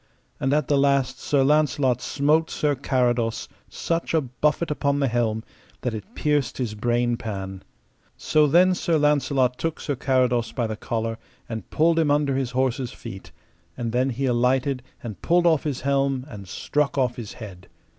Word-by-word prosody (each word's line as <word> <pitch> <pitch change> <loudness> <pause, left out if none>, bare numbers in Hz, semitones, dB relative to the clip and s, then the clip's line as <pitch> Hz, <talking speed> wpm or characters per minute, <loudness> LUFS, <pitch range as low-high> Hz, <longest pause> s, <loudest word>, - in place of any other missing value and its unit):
And 135 - 0
at 150 -1 +1
the 145 -1 +3
last 140 -2 +2
Sir 140 -2 +2
Launcelot 145 -3 +2
smote 150 +3 +1
Sir 150 -1 0
Carados 120 -4 0 0.2
such 165 0 -2
a 160 - +4
buffet 150 +5 -1
upon 140 -1 0
the 140 - +2
helm 115 -2 0 0.4
that 125 - -2
it 150 - -8
pierced 145 -5 0
his 120 -5 -2
brain 120 +2 0
pan. 95 -4 -6 0.6
So 155 -1 +3
then 180 +5 +5
Sir 170 -2 +1
Launcelot 140 -4 +2
took 165 +3 -2
Sir 145 - -2
Carados 125 -3 +1
by 120 - -1
the 110 -1 -3
collar 115 +1 -3 0.3
and 110 -4 -6
pulled 165 +1 +3
him 160 -2 +2
under 145 -2 +2
his 135 -2 -1
horse's 130 -1 -1
feet, 95 0 -10 0.5
and 120 -2 -3
then 125 +3 +1
he 135 +2 -2
alighted 125 +2 +1 0.2
and 110 -4 -7
pulled 175 +1 +3
off 160 -3 +3
his 140 -4 -2
helm 135 -1 0
and 105 -8 -10
struck 145 +10 -1
off 125 -3 +1
his 115 -4 -7
head. 95 -5 -10
130 Hz, 175 wpm, -24 LUFS, 120-145 Hz, 0.6 s, then